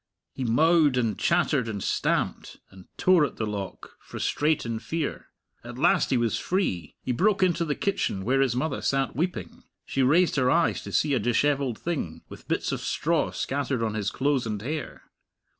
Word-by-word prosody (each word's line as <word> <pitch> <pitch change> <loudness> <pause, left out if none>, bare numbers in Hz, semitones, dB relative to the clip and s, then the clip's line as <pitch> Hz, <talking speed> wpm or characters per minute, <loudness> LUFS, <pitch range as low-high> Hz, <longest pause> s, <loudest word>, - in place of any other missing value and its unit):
He 130 - -4
mowed 150 +3 +4
and 115 -4 +1
chattered 115 - +1
and 100 -3 -4
stamped, - - -1
and 95 -1 -15
tore 185 -4 +4
at 140 - -2
the 110 - -2
lock, 100 -2 -6
frustrate 150 -2 -1
in 115 -1 -3
fear. 150 +7 -4 0.4
At 120 +1 -9
last 165 +6 +3
he 130 - +2
was 120 -2 0
free! 95 - -2
He 130 - -2
broke 190 - +2
into 175 -2 +2
the 150 -2 -1
kitchen, 100 - -1
where 135 +3 +2
his 130 -3 +1
mother 135 +3 -2
sat 135 -2 0
weeping. 175 +6 -3 0.2
She 135 - -1
raised 160 +6 +3
her 130 -1 +3
eyes 170 +3 +2
to - - -6
see 150 -2 +2
a 130 - +2
dishevelled 130 +1 +1
thing, 145 - -4
with - - -12
bits - - -1
of - - -3
straw - - 0
scattered 135 -3 -2
on 110 -1 -1
his 105 -2 -1
clothes 135 -2 0
and 105 -2 -3
hair. 150 +3 -5
135 Hz, 185 wpm, -26 LUFS, 115-155 Hz, 0.4 s, mowed